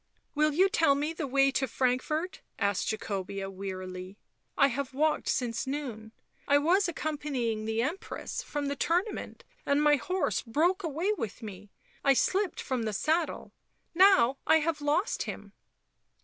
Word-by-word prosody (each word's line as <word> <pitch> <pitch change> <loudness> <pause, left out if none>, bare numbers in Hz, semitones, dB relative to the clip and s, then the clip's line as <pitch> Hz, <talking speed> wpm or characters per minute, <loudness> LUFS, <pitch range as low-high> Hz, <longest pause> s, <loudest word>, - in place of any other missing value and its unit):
"Will 305 0 +3
you 365 +6 +4
tell 330 -9 +3
me 295 +3 -1
the 315 -3 -4
way 275 +1 +3
to 265 0 0
Frankfort 265 +8 -1
?" - - -47
asked 200 -3 0
Jacobea 195 -2 -4
wearily. 185 0 -6 0.2
" - - -47
I - - +3
have 265 +1 -4
walked 305 +2 +1
since 245 +1 -1
noon. 250 -6 -5 0.4
I 285 - +5
was 350 +7 +3
accompanying 280 -9 -2
the 220 +1 0
Empress 330 +9 -4
from 290 -1 -4
the 280 - -1
tournament 345 +9 -1 0.2
and 280 +1 +2
my 295 0 +5
horse 370 +6 -1
broke 330 - +1
away 335 +5 -1
with 225 - -5
me 205 -1 -9 0.2
— - - -32
I 275 - +5
slipped 385 +7 +1
from 255 -2 -2
the 220 -1 -2
saddle. 315 - -1 0.4
Now 360 -8 +5
I 315 - +6
have 305 -1 -1
lost 305 +8 +1
him." - - -8
280 Hz, 165 wpm, -29 LUFS, 225-320 Hz, 0.4 s, I